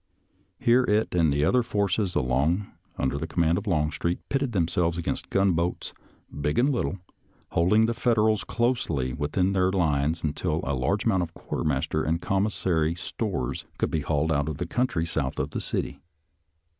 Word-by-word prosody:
Here 120 +2 +4
it 105 0 +1
and 85 -4 +3
the 70 +1 +2
other 125 +9 +4
forces 100 -3 0
along 75 +9 +1 0.3
under 70 +2 -1
command 85 +1 +2
of 105 - -11
Longstreet 80 0 0
pitted 135 -2 0
them 90 -6 +1
selves 85 -1 0
against 85 - -3
gunboats, 90 -3 0 0.5
big 75 +1 0
and 135 +4 +4
little, 120 -6 -1 0.5
holding 105 +7 +4
the 115 - 0
Federals 110 -3 +2
closely 85 - 0
within 90 +8 0
their 95 -1 +2
lines 80 -3 +1
until 80 +1 -1
a 70 - -1
large 70 - 0
amount 95 -5 +3
of 85 -1 -5
quarter - - -4
master 75 +1 0
and 80 +2 0
commissary 90 -4 0
stores 75 -5 -3
could - - -1
be 80 - +1
hauled 80 +1 0
out 70 0 +1
of 75 - -4
the 90 - -2
country 90 -4 0
south 70 -5 -2
of - - -2
the - - -3
city. - - -3
85 Hz, 170 wpm, -26 LUFS, 75-100 Hz, 0.5 s, Here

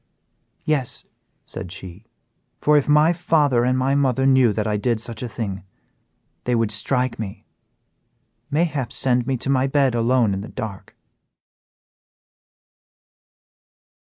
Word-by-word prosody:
"Yes," 145 -5 -1 0.4
said 85 - -8
she, 95 +1 -10 0.5
"for 150 - +3
if 145 0 +2
my 150 +3 +5
father 150 -8 +2
and 130 +1 +1
my 130 +1 +1
mother 135 -2 +1
knew 130 -4 +5
that 105 0 -2
I 105 -1 0
did 115 +2 0
such 115 -1 -5
a 125 - -4
thing, 100 -5 -5 0.8
they 125 - +1
would 115 -2 +1
strike 125 +4 0
me, 100 -3 -7 1.0
mayhap 145 -6 -1
send 125 -3 +1
me 135 -1 0
to 130 - -4
my 130 0 +2
bed 135 -2 +2
alone 120 -2 +2
in 95 - -3
the 105 - -8
dark." 100 -3 -7
125 Hz, 130 wpm, -22 LUFS, 110-135 Hz, 1.0 s, my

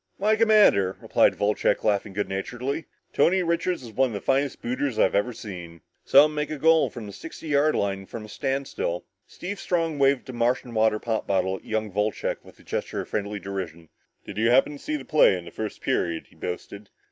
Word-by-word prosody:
"Why, 215 +3 +3
Commander," 210 - +4
replied - - +3
Wolcheck, 105 +1 +1
laughing 100 -1 0
good 105 +1 -1
naturedly, 125 +10 -3 0.3
"Tony 185 +2 +3
Richards 170 -2 -1
is 115 - -9
one 130 +4 +2
of - - -7
the 100 - -3
finest 135 +5 0
booters 125 +1 -2
I've - - +3
ever 100 +5 +1
seen. 85 -7 -9 0.2
Saw 145 - +8
him 155 - -2
make 150 0 -2
a 155 - -4
goal 160 +2 +4
from 120 -4 -8
the 100 - -9
sixty 160 +3 -9
yard 145 +1 +3
line 95 -1 -1
from 110 -2 -7
a - - -11
standstill." 135 -8 -3 0.2
Steve 195 +2 -6
Strong 165 -4 -1
waved 135 -1 +3
a 130 - -7
Martian 120 +1 0
water 110 -1 +3
pop 110 0 -2
bottle 95 -1 +1
at - - -18
young 110 -1 -2
Wolcheck 105 +2 -1
in - - -15
a - - -16
gesture - - -3
of - - -10
friendly 105 0 -3
derision. 90 -5 -6 0.4
"Did - - -6
you 115 +1 +3
happen 130 +4 +4
to 145 - -9
see 305 - -3
the 300 - -5
play 150 -10 +5
in 90 - -9
the 85 - -10
first 110 -1 -5
period?" 85 -1 -1
he - - -21
boasted. 100 +3 -6
115 Hz, 215 wpm, -25 LUFS, 100-145 Hz, 0.4 s, Saw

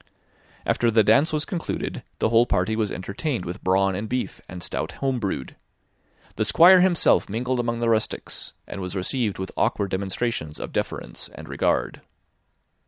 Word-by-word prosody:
After 120 - +2
the 110 -1 +4
dance 140 +9 +4
was 155 0 0
concluded, 175 -5 -4 0.2
the - - +1
whole 115 +1 +4
party 110 - +1
was 110 -2 0
entertained 100 - -3
with 85 +1 -6
brawn 95 +1 +2
and 105 +3 -4
beef, 125 0 -3
and 90 -2 -7
stout - - -3
home 135 -2 -1
brewed. 100 -4 -3 0.8
The - - +2
Squire 170 - +7
himself 180 -2 +4
mingled 125 +4 -1
among 120 -1 -1
the 115 - +2
rustics, 110 -1 -1
and 100 - -7
was 90 +1 -5
received 105 +3 -1
with 95 0 -5
awkward 100 -2 0
demonstrations 95 -4 -2
of - - -6
deference - - -4
and - - -11
regard. - - 0
110 Hz, 165 wpm, -24 LUFS, 95-125 Hz, 0.8 s, Squire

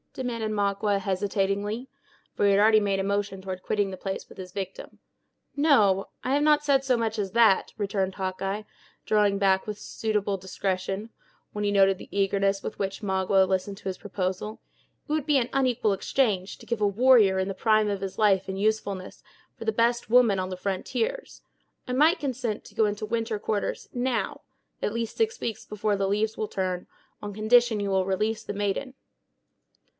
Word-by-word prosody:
demanded 230 -4 -3
Magua, 200 0 +1
hesitatingly; 200 +4 -1 0.5
for - - -2
he 200 - +5
had 195 - +4
already 215 +1 +6
made 200 -1 0
a - - 0
motion 200 0 -1
toward 190 -1 -6
quitting 205 -1 0
the 185 - -6
place 195 0 -5
with - - -15
his 185 -1 -8
victim. 205 - -7 0.6
"No, 290 +3 +1 0.2
no; 195 +1 -6
I 260 - 0
have 290 +1 +2
not 300 -1 +4
said 275 -2 +3
so 255 -2 +2
much 225 -1 -1
as 195 -2 -2
that," 225 -4 +4
returned 195 -2 -1
Hawkeye, 195 +2 -3 0.4
drawing 205 -2 +3
back 190 -1 +2
with 210 -1 -4
suitable 210 -2 -2
discretion, 190 +2 -3 0.4
when 210 - -3
he 205 - +1
noted 195 -1 +4
the - - -11
eagerness 195 0 +1
with - - -5
which 195 +1 -3
Magua 190 -1 +2
listened 190 +1 -1
to - - -15
his 185 -1 -4
proposal. 195 +1 -3 0.5
"It 300 - -2
would 310 -3 0
be 295 -2 +4
an 245 -2 0
unequal 250 -6 +2
exchange, 195 -2 0
to - - -14
give 235 -2 -3
a 205 - +4
warrior, 215 -2 +5
in 190 - 0
the 195 - -2
prime 215 0 +2
of 200 -2 -2
his 195 -1 -5
age 195 -3 +3
and 190 0 -3
usefulness, 200 -3 -2 0.3
for - - -8
the 220 - +1
best 235 +1 +1
woman 230 -5 +5
on 185 0 -2
the 185 - -5
frontiers. 450 - -3 0.5
I 250 - -2
might 310 +8 +4
consent 245 -6 -3
to - - -15
go 220 - +3
into 210 +1 -2
winter 225 -1 -2
quarters, 205 0 -2
now 250 0 -1 0.4
—at 210 - -1
least 230 -1 -3
six 450 0 0
weeks 225 - -4
afore 210 0 0
the 195 -1 0
leaves 215 +2 0
will 215 - -2
turn—on 185 +2 -5
condition 220 +1 +3
you 200 -1 -1
will 190 -1 +2
release 215 +3 -1
the 205 - -5
maiden." 205 +6 -2
205 Hz, 190 wpm, -26 LUFS, 195-230 Hz, 0.6 s, already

